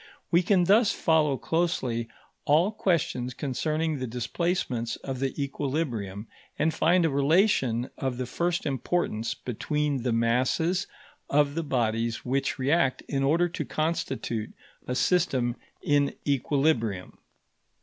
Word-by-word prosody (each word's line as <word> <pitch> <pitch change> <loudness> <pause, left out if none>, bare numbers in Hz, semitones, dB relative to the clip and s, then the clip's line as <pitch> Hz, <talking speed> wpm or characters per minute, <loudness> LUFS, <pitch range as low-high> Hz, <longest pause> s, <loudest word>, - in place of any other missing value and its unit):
We 170 0 +5
can 185 0 +3
thus 205 +4 +5
follow 155 -4 +2
closely 130 -10 -1 0.4
all 160 +8 +4
questions 155 - -1
concerning 155 +3 -1
the 130 - -3
displacements 125 -1 -2
of 135 -2 -6
the 135 +2 -2
equilibrium, 130 -8 -3 0.3
and 160 +1 +1
find 175 +2 +3
a - - +3
relation 140 - +2
of 130 -2 -2
the 130 - -2
first 170 +7 -1
importance 130 -4 -1
between 145 +3 -2
the 125 0 0
masses 130 +11 +1 0.4
of 145 0 +3
the 165 - -1
bodies 115 -5 -1
which 135 +2 0
react 135 0 +1
in 140 -1 -1
order 165 +6 +3
to 175 - -4
constitute 135 -8 -2 0.4
a 125 - -1
system 130 -8 +1 0.3
in 145 -1 +2
equilibrium. 135 -8 0
140 Hz, 125 wpm, -27 LUFS, 125-165 Hz, 0.4 s, We